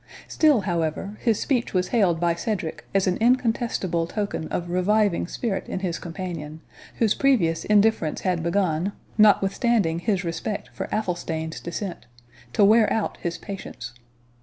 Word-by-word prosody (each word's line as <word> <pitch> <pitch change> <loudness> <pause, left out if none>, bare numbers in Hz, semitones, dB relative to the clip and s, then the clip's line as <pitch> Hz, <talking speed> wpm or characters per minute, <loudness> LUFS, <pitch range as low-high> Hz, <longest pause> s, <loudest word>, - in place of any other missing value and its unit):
Still, 300 -8 +3
however, 175 +2 -2
his 225 -4 +2
speech 245 -7 -1
was 180 0 +1
hailed 190 -9 +2
by 170 0 +2
Cedric 170 -2 -4
as 195 -1 +2
an 185 -1 +1
incontestible 225 -8 +1
token 200 -4 -3
of 175 0 -3
reviving 200 0 +2
spirit 205 0 -3
in 185 - -3
his 175 -3 -2
companion, 165 -3 -6 0.4
whose 220 -3 +2
previous 175 - +2
indifference 210 -6 +2
had 180 -3 0
begun, 170 +1 0 0.3
notwithstanding 200 -3 +3
his 195 0 0
respect 165 - -4
for - - -4
Athelstane's 170 -6 -2
descent, 175 - -6 0.4
to 200 - +4
wear 215 +1 +5
out 220 - -1
his 170 -1 -4
patience. 125 - -8
185 Hz, 140 wpm, -24 LUFS, 170-215 Hz, 0.4 s, wear